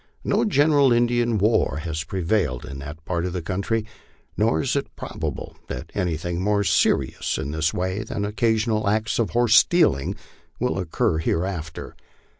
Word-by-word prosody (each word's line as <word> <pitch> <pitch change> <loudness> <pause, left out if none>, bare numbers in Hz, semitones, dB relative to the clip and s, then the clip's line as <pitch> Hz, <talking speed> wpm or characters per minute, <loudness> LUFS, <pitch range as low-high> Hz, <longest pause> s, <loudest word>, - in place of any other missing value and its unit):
No - - +1
general 145 - +4
Indian 120 -1 +2
war 105 -6 +2
has 80 -1 -3
prevailed 85 - -1
in 70 - -7
that 75 +3 -9
part 85 -2 -1
of 90 -1 -3
the 90 - -2
country, 100 +5 -1 0.5
nor 110 +3 +2
is 135 - 0
it 140 - -3
probable - - -5
that - - -6
anything 85 -2 -2
more 100 +1 +2
serious - - +1
in 70 - -3
this 80 +1 0
way 95 +3 -2
than 110 -1 -4
occa 110 +2 +1
sional 110 -2 0
acts 110 +2 0
of 115 - +1
horse 120 -2 +3
stealing 100 - +4 0.4
will 125 -5 0
occur 80 -2 0
hereafter. 85 -1 -3
100 Hz, 160 wpm, -23 LUFS, 85-115 Hz, 0.5 s, general